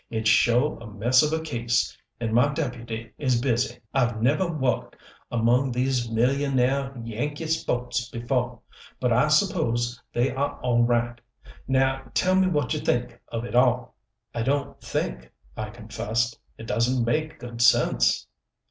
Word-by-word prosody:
"It's 110 -1 0
sho' 125 +7 +3
a 115 - -9
mess 120 +6 +4
of 150 - +1
a 160 0 -1
case 120 -5 0 0.2
and 115 -2 -2
my 125 +5 +4
deputy 115 -6 -4
is 130 -4 +2
busy. 120 -2 0 0.2
I've 120 -4 +1
neveh 145 +10 +2
wo'ked 130 -4 -1 0.4
among 120 +3 +2
these 125 -1 0
millionaih 135 +2 +1
Yankee 145 +8 -3
spo'ts 125 -6 -1
befo', 125 +1 -2 0.4
but 125 -2 +2
I 125 +6 +4
suppose 125 - +1
they 120 +3 +1
ah 140 +2 -2
all 120 -1 +3
right. 120 0 0 0.5
Now 135 0 +2
tell 185 +10 +3
me 190 0 +4
what 150 -8 0
you - - -1
think - - -1
of 115 +1 -4
it - - -7
all." 125 -1 +3 0.4
"I 115 - -2
don't 140 +4 -1
think," 60 0 -3 0.2
I 110 0 -4
confessed. 115 +1 -2 0.2
"It 115 - -9
doesn't 115 +3 +1
make 155 +6 -1
good 120 -1 -6
sense." - - +4
120 Hz, 150 wpm, -25 LUFS, 115-135 Hz, 0.5 s, mess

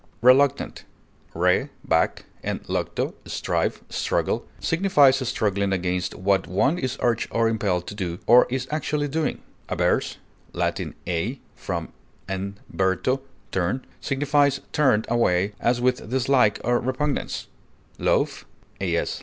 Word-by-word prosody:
Reluctant 130 +2 +4 0.5
(L. 85 - -5
re, 90 +10 +3 0.2
back, 80 0 +1 0.2
and - - -3
lucto, - - -2
strive, - - -1
struggle) - - -1
signifies 155 -7 +4
struggling 100 -4 0
against 90 -1 -1
what 95 +1 +1
one 135 - +1
is 130 0 -2
urged 120 -1 +1
or 115 0 +2
impelled 100 -6 0
to - - -6
do, 90 -4 -3
or 125 +1 +7
is 130 0 -2
actually 150 -1 -1
doing; 155 +2 -2 0.3
averse - - +1 0.4
(L. - - +1 0.3
a, 95 +10 -2 0.2
from, - - -4 0.4
and 95 +1 -4 0.2
verto, 95 +8 +1 0.3
turn) 95 +8 -1
signifies 145 0 +2
turned 130 -8 +3
away 100 -4 +2
as 120 +1 +2
with 125 -3 0
dislike 130 -3 +3
or 120 +1 +2
repugnance; 135 +3 -2 0.5
loath - - +1 0.4
(AS. 85 -3 -1
120 Hz, 125 wpm, -24 LUFS, 95-135 Hz, 0.5 s, or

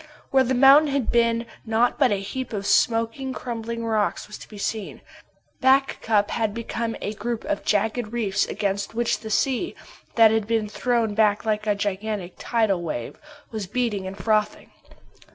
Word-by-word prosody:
Where 265 -1 +5
the 260 +1 0
mountain 275 +4 +7
had 275 -4 0
been, 235 0 +2 0.2
naught 230 +3 +1
but 265 -5 +4
a - - +3
heap 245 +5 -5
of 200 -2 -3
smoking, 230 +5 +1
crumbling 230 -2 -5
rocks 215 -2 0
was 210 - -9
to - - -11
be 210 - -11
seen. 205 0 -4 0.6
Back 270 +1 +3
Cup 210 -2 +1
had 220 -2 -1
become 230 0 -3
a 205 - -2
group 225 +2 -4
of 305 0 -2
jagged 215 +2 0
reefs 205 -5 0
against 200 +1 -2
which 235 0 0
the 220 - -8
sea, 265 - 0 0.4
that 225 -2 +7
had 220 -2 0
been 225 -2 0
thrown 230 0 0
back 210 -1 +2
like 215 0 -1
a 210 - +2
gigantic 200 -2 -3
tidal 220 -6 +1
wave, 150 -8 -5 0.3
was 215 -4 -4
beating 210 -3 -1
and 195 +1 -7
frothing. 215 +1 0
225 Hz, 170 wpm, -24 LUFS, 205-240 Hz, 0.6 s, mountain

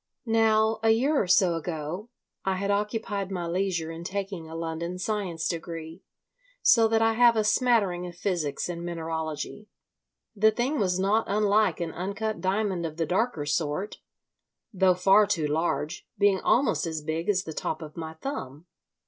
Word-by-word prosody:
Now, 220 -1 +3
a 225 - +3
year 270 +7 +3
or 190 - -2
so 180 -1 +4
ago, 165 +5 -4 0.3
I 190 0 0
had 200 +2 -1
occupied 205 -1 -2
my 180 -3 -3
leisure 170 -2 -1
in 165 +1 -7
taking 190 -3 -4
a 160 - -8
London 165 +2 -4
science 185 -4 -2
degree, 165 0 -5 0.6
so 230 -2 +6
that 225 0 +2
I 225 0 +3
have 235 0 +5
a 215 - +2
smattering 210 -6 +2
of 175 - -9
physics 175 -6 -2
and 170 -1 -5
mineralogy. 165 +3 -4 0.7
The 215 +1 +5
thing 245 +7 -1
was 185 -3 +1
not 200 +4 +2
unlike 210 +1 +2
an 170 -2 -3
uncut 200 +5 -3
diamond 190 -2 0
of 160 -1 -5
the 165 - 0
darker 185 -2 0
sort, 150 +6 -2 0.7
though 185 -1 +4
far 195 +3 +5
too 180 -7 0
large, 155 +2 -1
being 200 -2 +3
almost 245 -6 +2
as 160 -2 -4
big 160 +5 -3
as 190 -2 +2
the 160 - -6
top 155 +2 -3
of 155 -1 -10
my 160 -1 -6
thumb. 160 - -6
185 Hz, 165 wpm, -27 LUFS, 165-215 Hz, 0.7 s, so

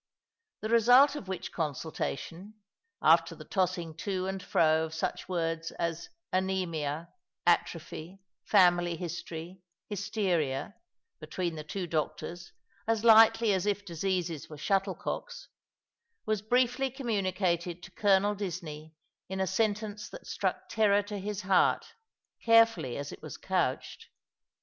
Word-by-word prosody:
The 215 - -3
result 245 +5 +6
of 210 - -7
which 190 -1 -5
consultation 165 +5 -4 0.2
— 460 0 -30
after - - +5
the - - -11
tossing 180 -4 -1
to 185 +1 -2
and 190 0 -3
fro 160 -2 +3
of 160 0 -8
such 185 +3 -3
words 165 -2 -1
as 170 0 -3 0.2
anrsmia, 170 -5 -1 0.4
atrophy, 170 +5 0 0.3
family 175 -1 +4
history, 175 +1 -6 0.3
hysteria, 195 -9 -1 0.5
between 175 -2 -3
the 155 -1 -6
two 180 +4 -4
doctors, 170 +2 -3 0.4
as 225 -1 +1
lightly 225 -1 +7
as 190 +1 0
if 205 0 0
diseases 175 -3 -2
were 155 - -9
shuttle 190 +5 0
cocks 485 -1 -6 0.4
— 465 -1 -53
was 215 -2 0
briefly 250 +4 +2
communicated 185 - -1
to 180 - -11
Colonel 205 0 +3
Disney 165 -6 -6 0.3
in 190 0 -4
a 190 - +2
sentence 210 +2 -1
that - - -11
struck - - -2
terror 205 -2 +3
to 205 0 -6
his 205 +1 -4
heart, 190 -1 +2 0.5
carefully 230 - +4
as 140 - -5
it - - -10
was - - -8
couched. - - -2
190 Hz, 130 wpm, -30 LUFS, 170-210 Hz, 0.5 s, lightly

